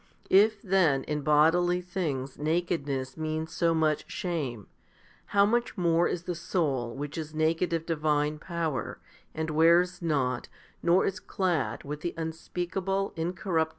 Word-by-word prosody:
If 205 +2 +5
then 170 -8 +3
in 150 -1 -2
bodily 165 +5 +4
things 160 -8 -3
nakedness 150 -4 -1
means 155 0 -3
so 165 -1 +2
much 155 -1 0
shame, 140 - -3 0.6
how 200 0 +4
much 235 +2 0
more 170 -1 +3
is 170 - -3
the 180 - -3
soul 145 -8 -1
which 145 +3 -5
is 155 0 -6
naked 160 +2 +1
of 165 -1 -1
divine 150 -2 0
power, 165 -5 -3 0.4
and 160 0 -2
wears 170 +3 +4
not, 135 -7 0 0.3
nor 175 +2 +4
is 195 +1 -2
clad 175 - -1
with 150 +1 -6
the 175 - -3
unspeakable, 180 +4 -2
incorruptible 175 +4 -3
1 - - +1
Rom. 160 0 +3
165 Hz, 150 wpm, -28 LUFS, 150-180 Hz, 0.6 s, If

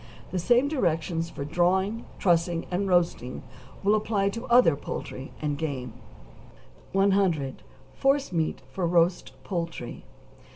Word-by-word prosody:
The 185 - -1
same 245 +9 +4
directions 165 - 0
for 140 - -6
drawing, 190 +7 +1
trussing, 170 -2 +2
and 190 +3 0
roasting 170 -8 +1 0.4
will 205 +2 +4
apply 210 -2 +1
to 230 +5 -6
other 240 - +6
poultry 135 -1 -6
and 145 -1 -1
game. 130 -7 -3 1.0
100. 190 -8 +2 0.3
=Forcemeat 270 - +1
for 180 -3 -1
Roast 170 +1 +2
Poultry. 170 - -4
175 Hz, 115 wpm, -27 LUFS, 160-200 Hz, 1.0 s, other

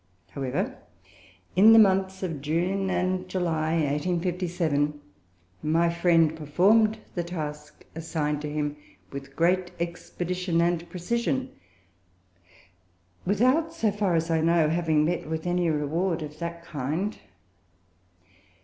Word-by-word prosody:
However, 135 -2 -3 0.8
in 210 +5 +8
the - - +8
months 190 -2 +3
of 165 -6 -3
June 180 +6 0
and 185 0 -1
July, 160 -4 0
1857, 165 -1 0 0.6
my 165 +2 +2
friend 170 -2 +3
performed 200 +9 +3 0.2
the 175 - -2
task 150 -3 -7
assigned 155 -2 -2
to 150 - -4
him 150 -1 -2 0.3
with 135 0 -8
great 180 +2 +2
expedition 175 +1 -2
and 170 0 0
precision, 235 +9 -2 1.8
without, 255 - +2
so 225 -10 +1
far 200 -4 0
as 165 +1 0
I 160 -1 +2
know, 165 -1 +3
having 160 -2 +2
met 170 -1 -2
with 160 0 -3
any 175 -1 +1
reward 160 +3 -1
of 150 0 -9
that 170 0 -5
kind. 160 +8 -3
170 Hz, 115 wpm, -26 LUFS, 155-185 Hz, 1.8 s, in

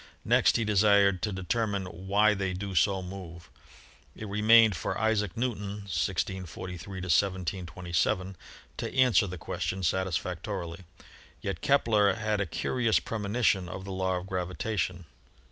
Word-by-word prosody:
Next - - +4
he 115 - 0
desired 100 -2 +4
to 105 -1 -1
determine 100 +2 -1
why 100 +4 +2
they 95 -2 -2
do 95 +1 -5
so 95 +2 +2
move. 90 -2 -9 0.6
It 110 - -7
remained 110 +1 +5
for - - -3
Isaac 105 -3 0
Newton 105 -4 -3
(1643 95 0 -3
1727) 90 +1 -1 0.4
to - - -5
answer 125 -5 +4
the 90 0 -6
question 95 +4 -4
satisfactorily; 90 -1 -2 0.6
yet 95 -4 -4
Kepler 110 -8 +3
had 105 -1 -1
a 100 - -1
curious 115 +7 +1
premonition 105 -4 0
of 95 +3 -7
the 100 - -6
law 95 -1 -1
of 90 - -6
gravitation. 90 0 -3
95 Hz, 130 wpm, -28 LUFS, 90-105 Hz, 0.6 s, remained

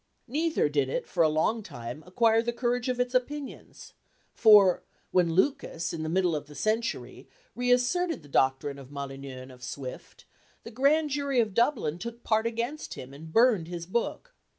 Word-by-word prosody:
Neither 310 - +1
did 145 -3 0
it - - -2
for 175 - 0
a 160 - +5
long 160 +9 +1
time 120 - -8
acquire 225 +4 +3
the 240 +1 -1
courage 245 +1 -1
of 250 -1 -1
its 250 0 0
opinions; 275 +2 -4 0.4
for, 205 -5 +6 0.3
when 175 -3 +3
Lucas, 175 - 0
in 165 - -4
the 155 - -3
middle 180 -1 +2
of 145 -1 -5
the 150 - -13
century, 220 - -2 0.3
reasserted 250 - +1
the - - -14
doctrine 135 +1 +1
of 135 -1 -12
Molyneux 135 -2 -7
and 130 - -12
of 125 -1 -15
Swift, 130 0 -8 0.4
the 230 - -9
Grand 290 +5 +2
Jury 280 -2 0
of 220 -4 +1
Dublin 230 - +1
took 235 +4 -7
part 220 0 +2
against 235 +7 -4
him, 130 +2 -9
and 160 +3 -11
burned 225 -5 +4
his 170 -1 -6
book. 235 - -3
215 Hz, 175 wpm, -28 LUFS, 150-245 Hz, 0.4 s, for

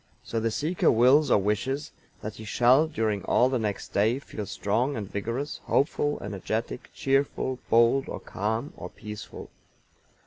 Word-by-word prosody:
So 115 - -2
the 115 +1 0
seeker 155 +10 +1
wills 130 +6 +5
or - - +5
wishes 120 +9 -1 0.3
that 110 - -6
he 110 - -8
shall, 125 +7 +4
during 110 -8 -1
all 125 - +4
the 130 -2 0
next 105 -3 -3
day, 110 +5 +2
feel 110 -7 -7
strong 120 +8 0
and 105 -3 -4
vigorous, 115 +9 -4
hopeful, 145 +1 +1
energetic, 110 +4 -4
cheerful, 135 -1 0
bold 120 +4 +4
or - - -5
calm 110 +8 -3
or - - -7
peaceful. 105 -1 -9
115 Hz, 150 wpm, -27 LUFS, 105-135 Hz, 0.3 s, wills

